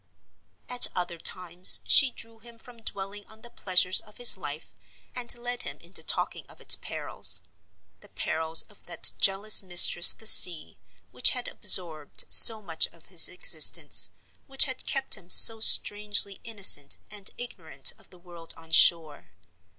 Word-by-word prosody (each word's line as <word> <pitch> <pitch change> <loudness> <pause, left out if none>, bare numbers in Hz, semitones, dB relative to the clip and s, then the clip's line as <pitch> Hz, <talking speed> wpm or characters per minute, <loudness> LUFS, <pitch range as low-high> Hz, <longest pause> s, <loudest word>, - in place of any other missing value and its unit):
At 250 0 +1
other 175 -2 -8
times 180 +1 +1
she 275 - +1
drew 230 -2 -15
him 235 +1 -20
from 235 0 -21
dwelling 200 -1 -11
on 220 +1 -23
the 240 - -16
pleasures 185 0 -2
of 210 - -23
his 245 -1 +4
life, 155 -5 -13 0.4
and 245 -1 -5
led 245 +1 -9
him 140 +1 -10
into 170 +1 -7
talking - - -5
of - - -17
its - - +1
perils—the - - -1
perils 160 0 -2
of 210 - -26
that 170 -2 0
jealous 200 +2 +2
mistress 175 -2 +3
the 220 - -14
sea, 170 - +3 0.3
which 125 0 +2
had 250 -1 -9
absorbed 165 -7 -2
so 220 -2 +6
much 160 -4 -3
of - - -24
his - - +4
existence, - - 0 0.4
which 270 -1 +2
had 260 -2 -11
kept 270 -1 -4
him 180 -3 -6
so 225 +4 +7
strangely 205 -2 0
innocent 200 -11 -2
and 205 -2 -11
ignorant 160 - -5
of - - -23
the 180 - -20
world 175 -2 -15
on 165 0 -18
shore. 155 - -1
195 Hz, 155 wpm, -22 LUFS, 170-225 Hz, 0.4 s, so